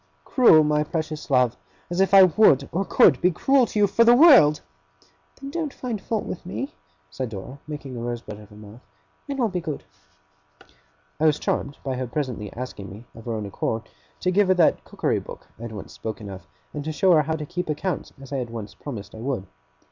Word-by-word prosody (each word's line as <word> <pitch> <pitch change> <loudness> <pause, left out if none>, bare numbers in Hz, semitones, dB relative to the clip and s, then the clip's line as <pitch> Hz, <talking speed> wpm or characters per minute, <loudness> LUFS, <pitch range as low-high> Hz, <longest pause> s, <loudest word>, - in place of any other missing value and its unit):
'Cruel, 165 - +6
my 150 0 +2
precious 155 0 -4
love! 125 -3 +3 0.4
As 175 +2 +1
if 195 - +2
I 195 -1 +9
would 160 -7 +4
or 185 +4 0
could - - +4
be 180 - +4
cruel 260 - +3
to - - -5
you, 205 - +5
for 205 +4 +3
the 235 +1 +7
world!' 250 - +7 0.8
'Then 275 0 -7
don't 315 -2 -3
find 235 -6 -4
fault 220 -2 -2
with - - -6
me,' 110 +8 -5 0.4
said 130 - -4
Dora, 110 +7 -8
making 145 -4 -7
a - - -5
rosebud 120 -3 -5
of 105 -1 -14
her 105 - -16
mouth; 105 +3 -13 0.5
'and 275 -1 -3
I'll 240 - +3
be 185 -4 -3
good.' 155 -4 -5 1.4
I 160 - +4
was 150 -1 +3
charmed 140 -1 -2
by 130 -2 -3
her 130 0 -3
presently 120 -6 -4
asking 120 -5 -7
me, 105 +5 -11
of 115 - -13
her 115 - -3
own 110 -2 -3
accord, 110 +3 -3 0.3
to 180 - +1
give 200 +1 +3
her 185 - +4
that 175 -3 +3
cookery - - -1
book - - -11
I - - -13
had 115 -1 -6
once 105 -3 -9
spoken 110 -2 -6
of, 95 -4 -10 0.3
and 145 - -4
to 155 - -3
show 180 +5 +3
her 160 -3 +6
how 160 +2 -2
to 155 -1 -5
keep 180 +2 -4
accounts 155 +3 -3
as 135 +1 -10
I - - 0
had 125 -3 -3
once 110 -3 -7
promised 115 -9 -8
I 110 - -10
would. 120 -5 -3
145 Hz, 220 wpm, -24 LUFS, 115-185 Hz, 1.4 s, I